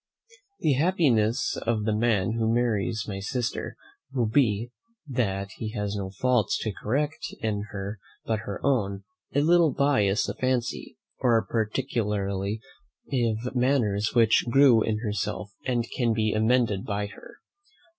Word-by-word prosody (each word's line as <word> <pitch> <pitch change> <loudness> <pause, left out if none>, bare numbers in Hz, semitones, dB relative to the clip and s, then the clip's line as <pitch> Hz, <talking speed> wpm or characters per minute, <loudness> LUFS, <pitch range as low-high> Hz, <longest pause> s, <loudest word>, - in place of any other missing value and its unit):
The 150 - +3
happiness 135 - +2
of 110 -2 -1
the 110 0 +1
man 105 -3 +1
who 115 0 0
marries 110 -2 0
my 100 -2 -4
sister 115 +4 -3 0.4
will 125 -3 +1
be, 115 -1 +1 0.4
that 100 -7 -1
he 110 -1 -5
has 105 0 -2
no 95 -2 -3
faults 120 +2 +1
to 110 - -1
correct 145 +10 -1 0.2
in 105 -2 -1
her 100 +1 -5 0.3
but 110 -1 0
her 100 -1 -6
own, 100 -8 +1 0.3
a 145 - +4
little 165 0 +4
bias 130 -8 +2
of - - -5
fancy, 130 -2 -1 0.2
or 120 -4 +3
particularity 105 -3 -1 0.5
of 120 -1 0
manners 120 -5 +1
which 115 -2 +4
grew 130 -3 +6
in 110 -1 0
herself, 105 -1 -3 0.2
and 120 -2 +1
can 120 -3 +2
be 110 -1 +1
amended 110 -2 +2
by 105 0 -2
her. 100 -1 -12
110 Hz, 140 wpm, -26 LUFS, 105-125 Hz, 0.5 s, grew